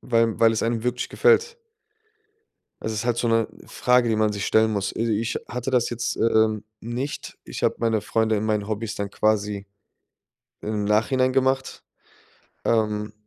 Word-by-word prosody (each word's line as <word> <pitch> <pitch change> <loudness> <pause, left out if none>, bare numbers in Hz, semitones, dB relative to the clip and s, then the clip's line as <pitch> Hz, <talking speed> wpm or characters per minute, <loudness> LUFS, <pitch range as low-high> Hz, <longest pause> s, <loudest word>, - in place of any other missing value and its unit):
weil 115 -3 +1
weil 115 -1 +5
es 110 - -1
einem 115 -1 0
wirklich 125 0 -1
gefällt? 465 0 +3 1.3
Es 110 - -3
ist 110 +2 -3
halt 120 -1 +1
so 120 - 0
'ne 115 -1 +2 0.2
Frage, 125 -1 +2
die 110 - +2
man 110 -1 +1
sich 100 -1 -3
stellen 110 0 +3
muss. 100 -1 -2
Also, 115 0 0
ich 110 +2 -1
hatte 125 +2 -4
das 125 -2 +2
jetzt, 120 +1 -3
ähm, 110 -2 +2 0.2
nicht. 120 +5 -5
Ich - - -6
habe - - +2
meine 115 -2 +1
Freunde 110 0 +1
in 105 - -1
meinen 105 -2 0
Hobbys 110 0 -3
dann 100 -1 -3
quasi 105 -1 0 1.0
im 105 -1 -2
Nachhinein 130 +5 +2
gemacht. 130 0 0 0.8
Ähm 105 -2 0
110 Hz, 165 wpm, -24 LUFS, 105-120 Hz, 1.3 s, weil